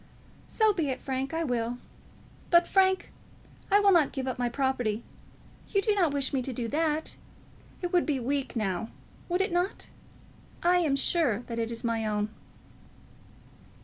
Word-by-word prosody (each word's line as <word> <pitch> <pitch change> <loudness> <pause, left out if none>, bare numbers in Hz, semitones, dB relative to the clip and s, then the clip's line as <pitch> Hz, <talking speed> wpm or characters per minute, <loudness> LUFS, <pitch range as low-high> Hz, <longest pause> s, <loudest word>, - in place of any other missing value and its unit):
"So 435 -2 +3
be 325 -7 -1
it, 260 - -2
Frank. 265 0 -3
I 325 +1 -1
will. 245 -3 -1 0.7
But, 345 0 +5
Frank, 380 -1 +2 0.6
I 405 - +6
will 405 -1 +5
not 335 -6 +4
give 265 -2 -4
up 255 - -3
my 245 -1 +1
property. 245 -4 -1 0.6
You 400 - +1
do 420 +1 +2
not 360 -7 +2
wish 280 -1 0
me 265 - +1
to 260 - -4
do 240 -1 -3
that. 310 +2 0 0.7
It 355 - -2
would 350 -1 +3
be 285 -4 +1
weak, 270 +2 -2
now; 215 -1 -1 0.4
would 355 +2 +1
it 385 - 0
not? 355 +3 -1 0.7
I 355 +1 +5
am 315 -6 +2
sure 275 - +1
that 230 -1 -5
it 230 0 -2
is 230 - -4
my 230 -1 0
own." 210 0 -1
275 Hz, 170 wpm, -28 LUFS, 240-350 Hz, 0.7 s, I